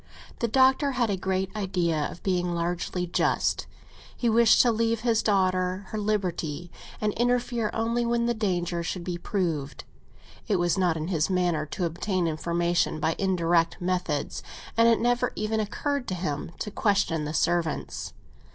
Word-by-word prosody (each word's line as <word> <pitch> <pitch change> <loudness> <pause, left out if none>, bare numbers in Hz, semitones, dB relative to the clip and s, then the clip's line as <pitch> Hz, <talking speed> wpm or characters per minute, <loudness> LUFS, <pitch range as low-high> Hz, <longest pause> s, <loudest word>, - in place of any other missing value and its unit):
The 235 - +1
Doctor 265 +4 +4
had 240 -4 +1
a - - +1
great 190 +1 -2
idea 175 -7 0
of 170 - -11
being 180 -2 0
largely 175 +1 -2
just: 175 - 0 0.5
he 240 - +1
wished 230 0 +5
to 240 - +4
leave 230 0 0
his 230 -2 +2
daughter 185 -1 +1
her 215 - -3
liberty, 175 -6 -2 0.3
and 210 -1 0
interfere 240 -2 0
only 230 +1 0
when 235 0 +1
the 240 - +2
danger 180 -6 -1
should 170 +1 -4
be 175 -1 -4
proved. 165 -7 -2 0.6
It 210 - +2
was 175 -2 +2
not 180 -4 +1
in 155 +2 -4
his 160 -3 +1
manner 175 -4 +1
to 175 +4 -2
obtain 175 +2 -1
information 170 +1 0
by 160 - +1
indirect 170 -3 +2
methods, 180 -5 -2 0.3
and 230 0 +5
it 230 -1 +4
never 245 +1 +1
even 215 +1 -1
occurred 275 +5 -2
to 185 - -2
him 165 -5 -3
to 210 - -4
question 195 -7 +1
the 150 - -4
servants. 170 -1 -1
185 Hz, 160 wpm, -27 LUFS, 170-225 Hz, 0.6 s, wished